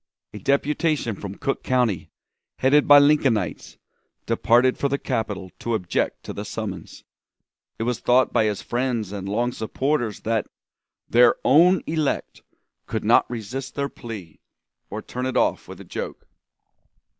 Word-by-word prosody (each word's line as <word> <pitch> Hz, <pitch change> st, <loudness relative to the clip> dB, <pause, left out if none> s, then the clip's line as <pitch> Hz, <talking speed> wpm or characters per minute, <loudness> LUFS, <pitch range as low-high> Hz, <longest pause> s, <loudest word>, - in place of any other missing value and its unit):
A 105 Hz, -, -7 dB
deputation 140 Hz, -, 0 dB
from 100 Hz, 0 st, -7 dB
Cook 135 Hz, -, -2 dB
County, 125 Hz, -7 st, 0 dB, 0.5 s
headed 140 Hz, +3 st, +3 dB
by 145 Hz, -, +9 dB
Lincolnites, 135 Hz, -, +1 dB, 0.5 s
departed 125 Hz, +2 st, +3 dB
for 140 Hz, -, -1 dB
the 140 Hz, -, 0 dB
capital 110 Hz, -9 st, -3 dB
to 120 Hz, -1 st, -1 dB
object 90 Hz, -5 st, -2 dB
to -, -, -6 dB
the 100 Hz, -, -5 dB
summons. 100 Hz, -5 st, -6 dB, 0.7 s
It -, -, -3 dB
was 120 Hz, 0 st, -1 dB
thought 125 Hz, +1 st, +3 dB
by 110 Hz, -, +3 dB
his 105 Hz, -2 st, -2 dB
friends 120 Hz, -5 st, -2 dB
and 100 Hz, -1 st, -5 dB
long 120 Hz, +4 st, 0 dB
supporters 120 Hz, 0 st, -2 dB
that 110 Hz, -1 st, -1 dB, 0.6 s
"their 120 Hz, 0 st, +5 dB
own 170 Hz, +7 st, +5 dB
elect" 155 Hz, -3 st, -2 dB, 0.5 s
could -, -, -3 dB
not -, -, +4 dB
resist 125 Hz, +3 st, -6 dB
their 140 Hz, 0 st, -1 dB
plea, 105 Hz, -12 st, -9 dB, 0.5 s
or -, -, -6 dB
turn 125 Hz, +1 st, -4 dB
it 130 Hz, -, -1 dB
off -, -, +1 dB
with -, -, -10 dB
a -, -, -11 dB
joke. -, -, -6 dB
120 Hz, 145 wpm, -23 LUFS, 105-135 Hz, 0.7 s, by